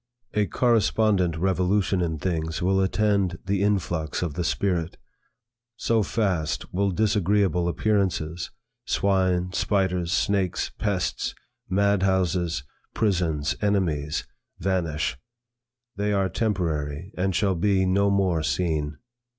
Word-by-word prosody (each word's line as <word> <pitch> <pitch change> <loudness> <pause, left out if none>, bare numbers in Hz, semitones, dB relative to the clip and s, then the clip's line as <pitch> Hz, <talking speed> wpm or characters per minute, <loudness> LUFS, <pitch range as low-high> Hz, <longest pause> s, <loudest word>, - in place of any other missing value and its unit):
A 105 -1 +2
correspondent 105 -6 +2
revolution 95 +2 +1
in 80 -2 -1
things 80 -1 -2
will 95 +1 +2
attend 100 -2 +1
the 100 0 0
influx 85 -6 0
of 85 -4 -2
the 90 - -2
spirit. 90 -2 -1 0.8
So 115 0 +1
fast 95 -8 -1
will 100 +2 +1
disagreeable 100 -3 +2
appearances, 90 -4 0 0.3
swine, 90 -2 +1
spiders, 90 -4 0
snakes, 95 -1 0
pests, 100 -4 -1 0.3
madhouses, 95 -5 +1 0.3
prisons, 85 -8 0
enemies, 85 -8 0 0.3
vanish; 85 -8 -1 0.8
they 105 +1 0
are 95 -1 +1
temporary 85 -6 -2
and 95 0 0
shall 100 -1 +2
be 95 +2 +2
no 100 +2 +3
more 95 -5 +2
seen. 75 -1 -1
95 Hz, 105 wpm, -25 LUFS, 85-100 Hz, 0.8 s, no